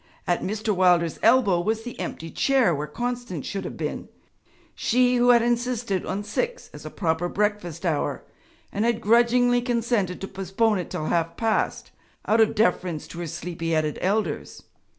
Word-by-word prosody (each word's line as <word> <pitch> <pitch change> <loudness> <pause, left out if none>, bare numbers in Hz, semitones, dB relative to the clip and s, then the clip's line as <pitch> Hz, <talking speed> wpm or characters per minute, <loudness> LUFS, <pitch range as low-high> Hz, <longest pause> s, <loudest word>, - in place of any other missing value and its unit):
At 175 - 0
Mr. 215 +1 -1
Wilder's 175 -3 +3
elbow 220 -7 +4
was 220 +4 -1
the 245 0 -8
empty 165 0 -5
chair 265 -9 +3
where 150 0 -3
Constance 240 - -4
should 195 -1 -4
have - - -6
been - - -4 0.6
she 250 +1 +2
who 245 +1 +4
had 240 -1 +6
insisted 240 -4 -1
on 195 +2 -2
six 485 - -3
as - - -9
a - - -5
proper 170 -1 -1
breakfast 200 -5 -2
hour, 160 -4 -1 0.5
and 205 - -1
had 235 -1 +1
grudgingly 240 +2 +4
consented 235 -6 0
to 195 - -4
postpone 195 +3 0
it 180 - -5
till 155 - -4
half 170 0 -1
past 225 -1 -1 0.3
out 225 +1 +3
of 220 0 +3
deference 180 -6 0
to 170 - -8
her 170 - -4
sleepy 165 +1 -4
headed 155 -1 0
elders. 195 -4 -2
205 Hz, 170 wpm, -25 LUFS, 175-235 Hz, 0.6 s, had